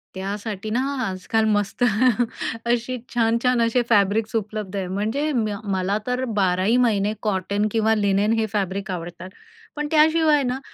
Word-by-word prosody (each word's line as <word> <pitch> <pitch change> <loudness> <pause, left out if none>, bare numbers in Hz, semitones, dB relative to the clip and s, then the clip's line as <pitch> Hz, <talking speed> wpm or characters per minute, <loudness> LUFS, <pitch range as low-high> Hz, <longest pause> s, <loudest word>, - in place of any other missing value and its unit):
त्यासाठी 200 +2 -5
ना 235 +4 0 0.3
आजकाल 220 +4 -1
मस्त 205 +4 -2 0.8
अशी 240 +2 0 0.2
छान-छान 235 +1 +2
असे 235 +2 +2
फॅब्रिक्स 215 +2 +2
उपलब्ध 215 -2 -3
आहे. 190 -2 -2
म्हणजे 220 +11 -1
म्य 215 -5 0
मला 195 0 -1
तर 250 +1 -1 0.2
बाराही 190 +6 +2
महिने 215 -4 +2
कॉटन 200 +1 0
किंवा 220 0 +2
लिनेन 205 +1 +2
हे 220 - +1
फॅब्रिक 195 -1 -2
आवडतात. 175 +1 -6 0.5
पण 295 0 -2
त्याशिवाय 310 -1 +4
ना 250 +1 -2
215 Hz, 140 wpm, -22 LUFS, 195-240 Hz, 0.8 s, त्याशिवाय